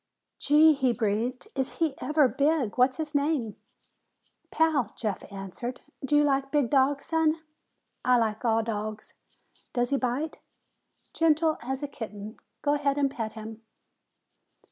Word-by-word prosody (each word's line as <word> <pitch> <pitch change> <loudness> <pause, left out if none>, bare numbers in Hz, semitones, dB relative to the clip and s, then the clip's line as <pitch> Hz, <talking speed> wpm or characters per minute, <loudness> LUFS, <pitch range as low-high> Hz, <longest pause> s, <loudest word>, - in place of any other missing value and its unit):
"Gee!" 305 +2 +6
he 265 -4 +1
breathed. 230 +3 -1
"Is 265 -1 -1
he 320 -4 0
ever 300 -2 +3
big! 280 -4 +1
What's 255 +1 +3
his 310 -1 -4
name?" 285 -7 0 0.9
"Pal," 305 -9 +1
Jeff 210 -4 -3
answered. 200 +6 -6 0.2
"Do 270 +2 +1
you 295 - +6
like 275 -1 +1
big 290 -6 +1
dogs, 275 0 +3
son?" 320 -1 +2 0.7
"I 250 -1 +4
like 220 -1 0
all 225 -1 +2
dogs. 215 -1 -5 0.6
Does 245 +1 0
he 280 - +3
bite?" 265 +5 -2 0.7
"Gentle 320 -1 +2
as 265 +3 -4
a - - -1
kitten. 215 -4 -8 0.3
Go 290 - +2
ahead 285 -1 0
and 280 -1 +2
pet 225 -4 -4
him." 220 0 -9
265 Hz, 145 wpm, -27 LUFS, 225-295 Hz, 0.9 s, Gee